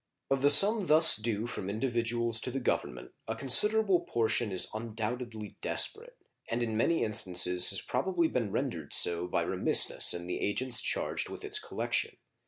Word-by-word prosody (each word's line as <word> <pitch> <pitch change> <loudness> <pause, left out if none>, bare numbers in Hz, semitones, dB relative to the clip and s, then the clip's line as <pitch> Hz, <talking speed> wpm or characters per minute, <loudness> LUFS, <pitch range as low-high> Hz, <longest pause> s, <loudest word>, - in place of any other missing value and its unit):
Of 135 -1 -1
the 145 - +3
sum 200 +6 +5
thus 160 +2 +6
due 110 0 -4
from 110 -5 -7
individuals 115 0 -3
to - - -2
the 135 +2 -5
Government 125 - -5 0.2
a 110 - -5
considerable 195 - +2
portion 115 -7 -3
is 95 - +1
undoubtedly 110 0 -7
desperate, 485 +3 0 0.3
and 120 +1 -3
in 110 -2 -4
many 165 +8 -1
instances 90 -4 +4
has 95 - +1
probably 170 +6 -2
been 115 -9 -4
rendered 105 - -5
so 85 +1 +3
by - - -2
remissness - - +2
in 85 0 -8
the 90 - -6
agents 125 +5 0
charged - - -3
with - - -11
its 415 +1 0
collection. - - -4
120 Hz, 165 wpm, -28 LUFS, 105-145 Hz, 0.3 s, thus